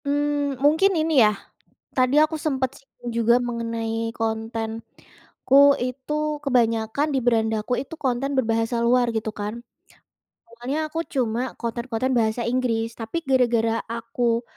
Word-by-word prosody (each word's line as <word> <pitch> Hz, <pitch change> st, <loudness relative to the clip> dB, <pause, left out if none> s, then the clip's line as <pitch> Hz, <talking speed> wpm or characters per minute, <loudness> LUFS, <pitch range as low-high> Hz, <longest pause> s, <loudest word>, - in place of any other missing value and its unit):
Mmm, 290 Hz, -1 st, 0 dB
mungkin 320 Hz, +7 st, +4 dB
ini 320 Hz, 0 st, 0 dB
ya, 215 Hz, -, +6 dB, 0.7 s
tadi 255 Hz, +1 st, +3 dB
aku 310 Hz, +1 st, +1 dB
sempet 265 Hz, -3 st, 0 dB
singgung 245 Hz, -3 st, -11 dB
juga 235 Hz, +1 st, +4 dB
mengenai 230 Hz, -1 st, -3 dB
kontenku 225 Hz, 0 st, -4 dB, 0.8 s
itu 255 Hz, +3 st, -4 dB, 0.3 s
kebanyakan 235 Hz, 0 st, +1 dB
di -, -, +3 dB
berandaku 225 Hz, -1 st, +1 dB
itu 275 Hz, +4 st, -8 dB
konten 270 Hz, -1 st, -1 dB
berbahasa 225 Hz, -1 st, +1 dB
luar 245 Hz, +1 st, +3 dB
gitu 220 Hz, 0 st, -2 dB
kan. 205 Hz, +1 st, -3 dB, 0.9 s
Awalnya 240 Hz, +5 st, -5 dB
aku 325 Hz, -, -3 dB
cuma 240 Hz, -4 st, 0 dB, 0.2 s
konten-konten 235 Hz, +2 st, -2 dB
bahasa 220 Hz, +1 st, 0 dB
Inggris 240 Hz, -3 st, 0 dB
tapi 225 Hz, +7 st, -4 dB
gara-gara 240 Hz, -3 st, +3 dB, 0.2 s
aku, 230 Hz, 0 st, -1 dB
240 Hz, 125 wpm, -23 LUFS, 225-265 Hz, 0.9 s, ya